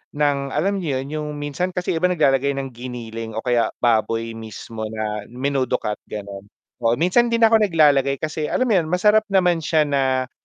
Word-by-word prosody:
ng 145 -1 +2 0.2
alam 195 +6 0
mo 170 - -4
'yun 135 +1 -2
'yung 155 -1 -3
minsan 145 +6 -3
kasi 180 - -1
'yung 165 - -1
iba 180 - +3
naglalagay 140 -2 +2
ng 135 -1 -4
giniling 115 -2 -7
o 110 - -3
kaya 120 -2 +2 0.2
baboy 115 0 +1
mismo 110 0 -7
na 105 -1 -4
menudo 130 +1 -1
cut, 105 0 -3
gano'n. 100 -1 -8 0.4
Oo 115 - +3
minsan 185 - +3
'di 235 - 0
na 230 -1 +4
ako 225 - +6
naglalagay 145 -5 +3
kasi 155 -1 -2
alam 255 - 0
mo 245 - 0
'yun 175 -6 +2
masarap 210 +5 +3
naman 180 -4 +2
siya 155 0 +2
na 130 -3 0
140 Hz, 195 wpm, -21 LUFS, 115-170 Hz, 0.4 s, ako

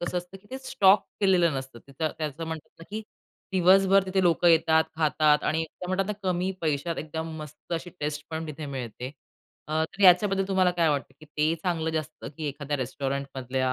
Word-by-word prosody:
कसं 175 +1 -1
असतं, 180 +2 -9
की 200 - -24
ते 260 - -5
स्टॉक 210 -7 +4 0.2
केलेलं 180 -5 +4
नसतं. 130 -2 -9 0.2
त्याचं 155 0 -2
म्हणतात 160 -2 -6
ना, - - -9
की 215 +1 -4 0.5
दिवसभर 190 +1 +5
तिथे 190 0 +1
लोकं 175 0 +4
येतात, 160 -1 +5
खातात 155 -1 +3
आणि 160 +1 +1
ते 160 +3 -10
म्हणतात 185 +1 0
ना, 210 - -1 0.2
कमी 180 +1 0
पैशात 160 +1 -1
एकदम 160 +1 -4
मस्त 150 +3 -10
अशी 170 +2 -5
टेस्ट 150 0 -3
पण 160 0 -4
तिथे 155 0 -6
मिळते. 125 -2 -5 0.6
अ, 155 +1 +1
तर 195 +5 -7
याच्याबद्दल 195 +1 +5
तुम्हाला 190 -2 +3
काय 165 -2 +3
वाटतं 145 -2 -1
की - - -12
ते 155 +2 0
चांगलं 165 -3 0
जास्त 155 -1 -4
की 155 - -4
एखाद्या 145 +1 -3
रेस्टॉरंटमधल्या 130 -1 -2
160 Hz, 185 wpm, -27 LUFS, 150-180 Hz, 0.6 s, दिवसभर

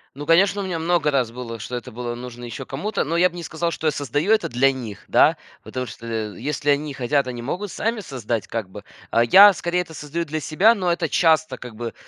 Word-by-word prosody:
Ну, 145 +2 -7
конечно, 190 +5 +4
у - - -4
меня 175 -3 -3
много 165 -2 +1
раз 130 -5 +1
было, 115 -1 -7
что 125 +3 -6
это 125 +1 -6
было 120 +1 -5
нужно 120 0 -9
еще 120 -1 -6
кому-то, 195 +11 -2
но 165 +3 -2
я 180 +2 +4
бы 175 - -15
не 175 - -6
сказал, 165 +1 -2
что 160 - -6
я 155 - +4
создаю 145 - -1
это 220 -1 +3
для 130 +3 +3
них, 120 -7 -8
да, - - +4 0.3
потому 130 0 -4
что, 115 - -10
э, 110 -4 -4
если 145 +3 0
они 145 +1 -1
хотят, 135 +2 0
они 120 -2 -5
могут 185 +10 -4
сами 225 +1 -2
создать, 120 - -4
как 110 -5 -4
бы. 105 +1 -10 0.3
А 115 - +4
я 195 - +8
скорее 175 0 -1
это 165 -2 -9
создаю 160 +3 -4
для 155 0 -3
себя, 185 +9 +4
но 185 -6 0
это 170 -1 0
часто, 160 -5 +2
как 120 -3 -9
бы, 115 +1 -5
145 Hz, 245 wpm, -22 LUFS, 120-170 Hz, 0.3 s, я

